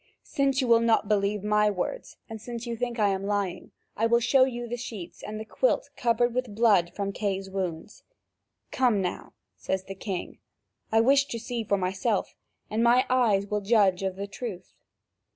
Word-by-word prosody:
Since 275 -1 0
you 255 - -1
will 230 -1 +6
not 230 -2 +2
believe 205 -1 +1
my 210 0 +3
words, 205 - -4
and 220 -2 -8
since 235 +1 -6
you 235 -1 -3
think 240 +1 -3
I 210 -2 +3
am 195 0 -1
lying, 200 -3 -2 0.3
I 225 - +1
will 235 +1 +4
show 260 +3 +4
you 240 -2 -4
the 240 - -3
sheets 220 -7 -8
and 215 +1 -6
the 220 - -6
quilt - - 0
covered 240 0 +1
with 250 -4 -3
blood 205 -6 +4
from 200 -1 -2
Kay's 195 -2 -3
wounds." 185 0 -4 0.7
"Come 245 -6 +2
now," 180 -2 -4 0.2
says 190 0 -2
the 195 - -7
king, 190 -2 -5 0.5
"I 225 0 +5
wish 275 +4 +4
to 235 - -5
see 235 0 -4
for 200 -1 +1
myself, 190 +3 -1 0.3
and 220 +2 0
my 240 +2 +5
eyes 220 -6 +3
will 210 0 -2
judge 200 -3 +3
of 190 -1 -2
the 200 +1 -4
truth." 200 -2 -7
215 Hz, 190 wpm, -27 LUFS, 195-240 Hz, 0.7 s, will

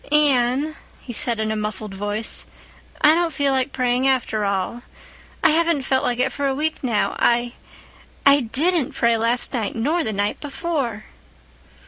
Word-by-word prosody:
"Anne," 285 0 +2 0.2
he 245 - -8
said 235 -3 -1
in 220 0 -1
a - - -1
muffled 210 -1 -4
voice. 205 +3 -4 0.5
"I 300 - +7
don't 340 0 +1
feel 280 -1 +1
like 265 +1 0
praying 250 0 +1
after 240 -5 +1
all. 200 +4 -2 0.6
I - - +6
haven't 330 -3 +2
felt 260 0 +1
like 245 -1 0
it 255 +1 +1
for 285 0 -2
a 270 - 0
week 310 +2 -2
now. 230 -5 0
I—I 240 +3 0
didnt't 285 +5 0
pray 235 0 +3
last 230 +4 0
night 225 -5 -2
nor 305 +9 0
the 220 - -2
night 205 0 -1
before." 280 -7 -3
250 Hz, 160 wpm, -22 LUFS, 225-285 Hz, 0.6 s, I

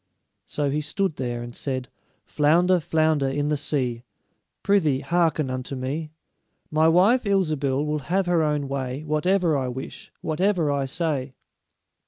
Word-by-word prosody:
So 145 -2 -1
he 150 +2 0
stood 160 +2 -2
there, 120 -2 -3
and 120 0 -9
said: 130 -2 -3 0.4
"Flounder, 175 +5 +3
flounder 155 -3 +1
in 145 +2 -1
the 150 - +2
sea, 130 -5 -1 0.6
Prythee, 160 -10 +2
hearken 165 -5 +1
unto 130 +1 -4
me: 140 +5 -3 0.6
My 155 +1 +4
wife, 195 +10 +4
Ilsebil, 155 - +1
will 150 0 -1
have 190 +2 +2
her 175 -2 +2
own 150 -2 0
way 135 +1 -3
Whatever 165 +2 +1
I 130 -2 -1
wish, 125 +1 -7
whatever 170 -1 +1
I 140 -1 0
say." 140 -3 -2
150 Hz, 145 wpm, -24 LUFS, 135-170 Hz, 0.6 s, My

